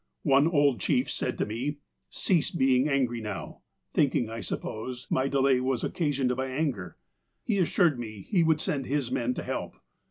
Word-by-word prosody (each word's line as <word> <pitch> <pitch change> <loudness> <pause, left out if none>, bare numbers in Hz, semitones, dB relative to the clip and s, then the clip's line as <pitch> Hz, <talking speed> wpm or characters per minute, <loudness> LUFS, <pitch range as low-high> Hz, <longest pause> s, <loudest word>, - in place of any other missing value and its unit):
One 140 +1 +5
old 145 - +3
chief - - +1
said - - -2
to - - 0
me: 125 +8 -3 0.2
' - - -52
Cease 175 -5 +3
being 135 -2 +2
angry 125 -4 +1
now,' 105 -4 -6 0.3
thinking, 125 -5 +2
I 115 - -5
suppose, 120 +4 -4
my 130 +1 +2
delay 135 -1 +3
was 130 -1 -1
occasioned 140 -7 0
by 130 +1 -2
anger. 130 - -2 0.5
He 205 -4 0
assured 170 -5 +3
me 110 -4 -7
he 185 - +2
would 160 -1 +3
send 140 -4 -2
his 140 -3 -1
men 125 +1 0
to - - -4
help. - - -4
130 Hz, 180 wpm, -28 LUFS, 120-145 Hz, 0.5 s, One